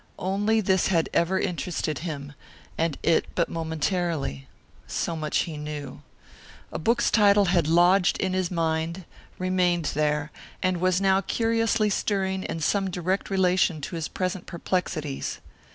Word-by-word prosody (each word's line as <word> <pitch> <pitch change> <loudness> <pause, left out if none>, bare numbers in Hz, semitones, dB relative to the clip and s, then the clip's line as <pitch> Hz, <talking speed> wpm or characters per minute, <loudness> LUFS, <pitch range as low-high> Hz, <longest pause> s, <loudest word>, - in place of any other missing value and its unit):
Only 205 +4 +1
this 190 -2 +2
had 165 -4 +1
ever 185 +3 +2
interested 165 -4 -2
him, 145 -4 -6 0.4
and 165 -3 -1
it 165 - +3
but 170 - +1
momentarily. 160 - -2 0.4
So 170 - -2
much 155 -1 0
he 160 -3 -6
knew. 150 -2 -6 0.7
A - - -4
book's 235 +7 +2
title 205 -2 +5
had 175 -4 +2
lodged 175 +3 +4
in 190 -1 -1
his 185 -2 0
mind, 165 +1 -1 0.3
remained 180 -2 +1
there, 150 0 0 0.3
and 185 -2 +1
was 185 0 +2
now 195 0 +3
curiously 225 -1 +1
stirring 190 -2 0
in 165 - -4
some 195 +4 +1
direct 185 +2 -2
relation 185 -4 +2
to 170 - -5
his 160 -2 -2
present 185 0 -3
perplexities. 170 -5 -3
180 Hz, 140 wpm, -26 LUFS, 160-190 Hz, 0.7 s, title